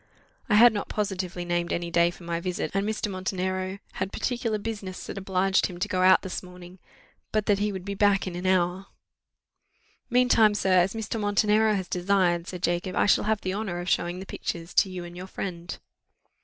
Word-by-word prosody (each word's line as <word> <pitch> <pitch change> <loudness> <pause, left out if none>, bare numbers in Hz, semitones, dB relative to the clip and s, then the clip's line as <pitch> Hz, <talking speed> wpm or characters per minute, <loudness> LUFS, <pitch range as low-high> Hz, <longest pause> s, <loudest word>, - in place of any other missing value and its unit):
I 210 - +4
had 235 +2 +8
not 205 - -4
positively 185 -4 -3
named 175 0 -1
any 170 0 -2
day 170 0 +4
for 175 - -12
my 170 0 -2
visit, 180 0 -3
and 195 +2 0
Mr. 215 -1 -2
Montenero 185 0 -3
had 190 +1 -4
particular 235 -3 -1
business 205 -3 -6
that - - -6
obliged 190 0 +1
him 180 - -9
to 180 - -1
go 185 - -1
out 185 0 +6
this 190 - -4
morning, 180 0 -13 0.5
but 215 -1 0
that 200 -1 +2
he 210 0 0
would 190 -2 -6
be 200 - -3
back 200 0 +3
in 185 -2 -5
an 180 +1 -3
hour: 185 +1 +1 1.2
"Meantime, 240 -4 +4
sir, 190 -2 +3
as 190 +4 +1
Mr. 225 0 -3
Montenero 210 +1 +3
has 190 -2 -3
desired," 180 -2 +1
said 180 -1 -7
Jacob, 175 +2 -1
"I - - +3
shall 205 - +3
have 215 -1 +1
the 185 - -2
honour 195 -4 -3
of 175 +1 -4
showing 175 +1 0
the 190 - -7
pictures 170 -2 -5
to 195 - +4
you 185 -1 -6
and 175 0 -10
your 180 +1 -7
friend." 175 -3 -6
185 Hz, 205 wpm, -26 LUFS, 180-205 Hz, 1.2 s, had